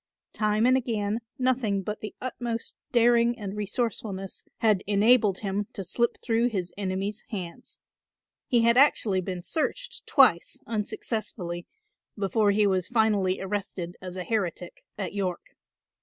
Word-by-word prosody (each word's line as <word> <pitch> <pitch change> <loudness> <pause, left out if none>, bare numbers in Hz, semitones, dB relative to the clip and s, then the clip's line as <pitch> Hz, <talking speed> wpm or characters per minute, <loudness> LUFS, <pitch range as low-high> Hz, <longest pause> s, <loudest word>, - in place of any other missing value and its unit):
Time 215 +1 +2
and 255 +1 +5
again 225 -4 -1 0.2
nothing 240 -6 +1
but 210 +2 -4
the 215 - -6
utmost 240 -2 -4 0.2
daring 235 0 +4
and 205 -3 -5
resourcefulness 205 -2 -3
had 210 -4 +2
enabled 210 -1 +4
him 200 0 -2
to 195 - -4
slip 235 +6 0
through 235 0 +2
his 185 -7 -3
enemies' 195 +2 -2
hands. 180 -6 -7 0.7
He 240 -4 +3
had 235 +1 +4
actually 220 -8 +4
been 180 -1 -5
searched 475 - -3
twice - - +4
unsuccessfully 210 -5 -3 0.5
before 205 +1 +2
he 205 +1 +4
was 185 -2 +1
finally 210 -5 +2
arrested 190 -3 -4
as 180 -1 -7
a 185 - -3
heretic 180 -5 -3
at 195 -3 -4
York. 185 -3 -3
210 Hz, 135 wpm, -27 LUFS, 190-235 Hz, 0.7 s, and